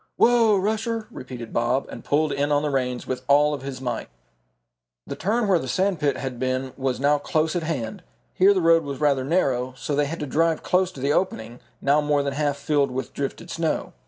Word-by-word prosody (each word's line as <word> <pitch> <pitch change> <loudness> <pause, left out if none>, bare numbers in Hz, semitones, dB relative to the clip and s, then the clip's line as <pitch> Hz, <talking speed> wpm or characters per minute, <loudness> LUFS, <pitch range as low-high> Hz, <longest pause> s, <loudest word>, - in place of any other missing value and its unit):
"Whoa, 230 -3 +5
Rusher!" 220 +3 -1
repeated 125 - -8
Bob, 120 +3 +1
and - - -9
pulled 150 +1 +1
in 145 +1 0
on 145 0 +2
the 150 - -1
reins 125 -2 -1
with 130 -1 -3
all 145 +1 +4
of 140 - -4
his 135 -1 -6
might. 120 - -4 1.0
The - - -5
turn 215 +5 0
where 185 -3 +4
the 130 - -5
sand 185 +4 0
pit 145 -2 +1
had 130 -3 -5
been 130 0 -2
was 130 -2 -2
now 145 +2 +3
close 155 +3 0
at 175 - 0
hand. 160 - -4 0.3
Here 195 +2 +5
the 185 - +2
road 165 0 +5
was 140 -2 -5
rather 140 -3 +2
narrow, 130 -5 0
so 135 +4 -3
they 145 0 +2
had 165 +4 -5
to - - -1
drive 160 +3 +1
close 185 0 +2
to - - -10
the 140 +2 +1
opening, 120 -11 -2 0.2
now 145 +2 +3
more 145 -1 +1
than 140 -1 -2
half 145 0 0
filled 145 -1 +1
with 130 +1 -5
drifted 140 +5 -5
snow. 165 -1 -2
145 Hz, 215 wpm, -24 LUFS, 130-165 Hz, 1.0 s, Whoa